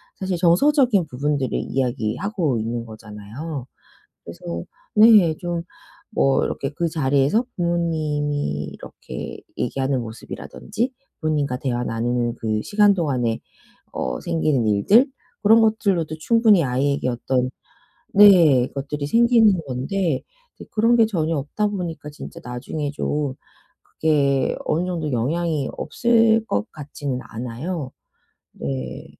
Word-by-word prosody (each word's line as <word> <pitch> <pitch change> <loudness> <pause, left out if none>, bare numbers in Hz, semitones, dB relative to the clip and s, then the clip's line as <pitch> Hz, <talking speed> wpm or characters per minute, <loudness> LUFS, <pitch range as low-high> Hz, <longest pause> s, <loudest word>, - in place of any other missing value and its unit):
사실 190 -2 -2
정서적인 210 - +4
부분들을 140 0 -1
이야기하고 135 - -1
있는 115 +1 -3
거잖아요. 110 +6 -8 0.6
그래서 85 0 -6 0.3
네. 210 -6 +7
좀 175 -2 -3 0.5
뭐 135 -8 +3
이렇게 135 - -3
그 165 +4 -2
자리에서 145 - +2
부모님이 150 - -1
이렇게 - - -8 0.2
얘기하는 135 +1 -1
모습이라든지 120 - -5 0.3
부모님과 150 -5 0
대화 125 -2 -2
나누는 120 +1 -1
그 110 -2 -2
시간 205 - +4
동안에 130 -10 -1 0.5
어 - - -3
생기는 155 -8 0
일들, 195 - +4 0.4
그런 220 +2 +7
것들로도 200 -8 +1
충분히 220 0 +4
아이에게 135 +1 0
어떤 125 +1 -1 0.6
네 170 -11 +7
것들이 140 +1 -4
생기는 230 -1 +4
건데 140 +4 -1 0.3
이제 - - -10
그런 230 +2 +3
게 225 -2 +5
전혀 165 -6 -1
없다 150 +10 -1
보니까 175 -7 -5
진짜 165 +3 -10
나중에 135 +4 -4
좀 145 -2 -2 0.5
그게 140 -4 +1
어느 170 +3 0
정도 165 -5 -3
영향이 150 +4 0
없을 225 +5 +2
것 100 - -1
같지는 145 -3 -5
않아요. 130 +6 -5 0.6
네. 65 -2 -5
150 Hz, 275 characters per minute, -22 LUFS, 125-185 Hz, 0.6 s, 네